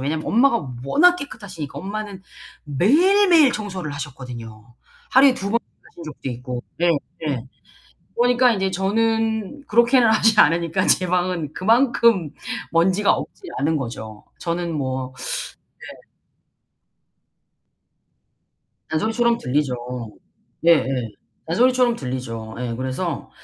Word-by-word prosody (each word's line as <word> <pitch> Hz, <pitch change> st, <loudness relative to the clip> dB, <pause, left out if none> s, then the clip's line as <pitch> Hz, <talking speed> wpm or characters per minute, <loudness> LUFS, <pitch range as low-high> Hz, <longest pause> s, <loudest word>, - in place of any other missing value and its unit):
왜냐면 155 Hz, +4 st, -3 dB
엄마가 235 Hz, -, +2 dB, 0.2 s
워낙 350 Hz, -, +5 dB
깨끗하시니까. 190 Hz, -, -8 dB
엄마는 200 Hz, 0 st, -6 dB, 0.4 s
매일 325 Hz, -, +3 dB
매일 310 Hz, -7 st, +6 dB
청소를 190 Hz, -7 st, -5 dB
하셨거든요. 120 Hz, -5 st, -9 dB, 0.4 s
하루에 265 Hz, -1 st, +6 dB
2 200 Hz, -5 st, -4 dB
번 235 Hz, -, +2 dB, 0.3 s
하신 170 Hz, -, -13 dB
적도 145 Hz, -3 st, -7 dB
있고. 125 Hz, 0 st, -6 dB, 0.2 s
네 175 Hz, 0 st, +3 dB, 0.4 s
네. 130 Hz, -5 st, -2 dB, 0.7 s
그러니까 245 Hz, 0 st, +4 dB
이제 190 Hz, -2 st, -1 dB
저는 220 Hz, +5 st, -1 dB
그렇게는 235 Hz, +2 st, +4 dB
하지 220 Hz, 0 st, +4 dB
않으니까 165 Hz, +3 st, +2 dB
제 185 Hz, -, +4 dB
방은 175 Hz, -4 st, -1 dB
그만큼 230 Hz, -, +3 dB, 0.4 s
먼지가 185 Hz, +4 st, +3 dB
없지 -, -, -5 dB, 0.2 s
않은 155 Hz, +3 st, +1 dB
거죠. 115 Hz, -5 st, -7 dB
저는 170 Hz, 0 st, -3 dB
뭐 130 Hz, -2 st, -3 dB, 0.8 s
네. -, -, -14 dB, 2.8 s
잔소리처럼 230 Hz, +7 st, +1 dB
들리죠. 135 Hz, -, -1 dB, 0.9 s
예예. 135 Hz, -8 st, +3 dB, 0.4 s
잔소리처럼 245 Hz, +6 st, +3 dB
들리죠. 115 Hz, -4 st, -6 dB
예, 120 Hz, -2 st, -3 dB
그래서 130 Hz, +6 st, -4 dB
180 Hz, 255 characters per minute, -21 LUFS, 135-225 Hz, 2.8 s, 매일